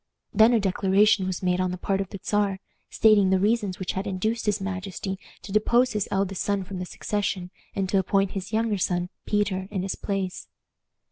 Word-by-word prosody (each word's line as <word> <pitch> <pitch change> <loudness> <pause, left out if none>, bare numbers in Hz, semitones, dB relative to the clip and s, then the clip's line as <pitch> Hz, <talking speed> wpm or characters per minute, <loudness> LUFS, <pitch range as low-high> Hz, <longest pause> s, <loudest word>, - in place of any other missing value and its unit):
Then 220 +2 +6
a 235 - +4
declaration 195 0 +3
was 185 0 -3
made 180 0 +2
on 185 - +1
the 180 - -4
part 195 +2 -1
of 195 - -5
the 195 - -7
Czar, 205 -2 +1 0.3
stating 210 -3 +4
the 190 - +4
reasons 205 -1 +1
which 185 - -3
had 190 +2 -3
induced 215 +4 -1
his 205 - +2
majesty 190 0 -4 0.2
to 200 - -8
depose 240 +4 +3
his 210 -2 -1
eldest 195 -1 -1
son 200 -1 0
from 185 0 -7
the 180 - -4
succession, 190 -2 -3 0.2
and 195 -1 0
to 195 - +3
appoint 195 +1 +1
his 195 +1 -5
younger 220 -2 0
son, 175 0 0 0.2
Peter, 195 -3 0
in 195 -3 -2
his 190 - -2
place. 195 -3 -3
195 Hz, 200 wpm, -25 LUFS, 185-210 Hz, 0.3 s, Then